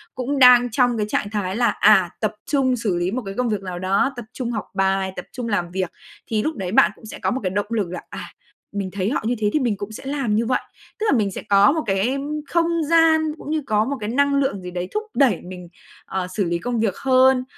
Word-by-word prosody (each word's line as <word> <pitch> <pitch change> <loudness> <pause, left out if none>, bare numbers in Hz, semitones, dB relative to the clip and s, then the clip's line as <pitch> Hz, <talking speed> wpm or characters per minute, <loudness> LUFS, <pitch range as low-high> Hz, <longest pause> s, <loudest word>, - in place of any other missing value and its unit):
cũng 270 +2 -2
đang 245 -2 +7
trong 245 0 +2
cái 210 - 0
trạng 205 - -1
thái 200 -3 -2
là, 240 +1 +2
à, 180 -3 +5
tập 215 0 0
trung 270 -3 +1
xử 215 -6 -1
lý 175 +2 -1
một 255 +2 -2
cái 195 - -5
công 250 -2 0
việc 210 -2 -1
nào 180 -2 -6
đó, 195 +9 +1
tập 240 -2 -7
trung 245 -2 -3
học 215 -4 -3
bài, 195 0 0
tập - - -7
trung 245 -3 -5
làm 175 -4 -1
việc, 185 -1 -2 0.4
thì 215 -1 0
lúc 315 - -2
đấy 190 -5 -4
bạn 170 -5 +5
cũng - - -16
sẽ 220 - -9
có - - 0
một 260 - -1
cái 185 - 0
động 205 +2 -2
lực 215 -6 -1
là, 180 - -5
à, - - -7 0.5
mình 195 -2 -2
thấy 195 +1 -1
họ - - 0
như 245 +2 +1
thế 210 -1 +1
thì 305 - +3
mình 235 -6 0
cũng 205 +1 -6
sẽ 220 - -9
làm 270 -6 -1
như 230 +1 +1
vậy, 255 - +1 0.4
tức 435 - -1
là - - +3
mình 205 -3 0
sẽ - - -6
có 200 +3 +6
một 320 0 -1
cái, 195 +3 +1
ưm, 285 +3 -3
không 340 -1 +2 0.2
gian 325 -1 +5 0.2
cũng - - -9
như 310 -1 0
có 215 0 +2
một 280 +1 -3
cái 210 0 -4
năng 280 +3 +2
lượng 270 -9 0
gì 180 0 -7
đấy 180 0 -4
thúc 425 - -1
đẩy 250 - +3
mình, 180 -1 -9 0.4
ờ, 190 -1 -3
xử 190 +3 -2
lý 170 -1 -1
công 240 +4 -2
việc 220 -4 0
hơn, 260 -1 +4
220 Hz, 270 wpm, -22 LUFS, 195-260 Hz, 0.5 s, đang